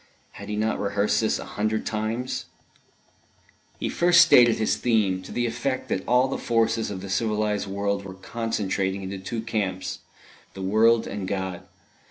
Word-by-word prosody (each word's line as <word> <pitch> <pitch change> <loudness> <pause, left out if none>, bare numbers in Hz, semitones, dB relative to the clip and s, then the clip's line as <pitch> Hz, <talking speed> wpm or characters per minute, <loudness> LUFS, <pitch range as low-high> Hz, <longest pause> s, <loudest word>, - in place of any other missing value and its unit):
(Had - - -10
he 105 - -2
not 110 +1 0
rehearsed 100 +1 +1
this 110 - +1
a - - -7
hundred 110 +1 -2
times!) 110 +4 -2 1.3
He - - -2
first 175 0 +5
stated 120 -2 +7
his 110 - +1
theme; 105 -6 +1
to 95 - -11
the 120 - -1
effect 120 +3 -2
that 95 - -1
all 125 +2 +4
the 135 - -3
forces 115 -1 +1
of 95 -2 -5
the 100 - -7
civilised 105 0 0
world 100 0 -2
were 95 -1 -8
concentrating 100 -2 -2
into 95 0 -5
two 110 +4 -4
camps 100 -5 -3 0.6
the 95 - -6
world 110 +4 +4
and 100 -2 -5
God. 95 -2 -3
105 Hz, 165 wpm, -25 LUFS, 95-115 Hz, 1.3 s, stated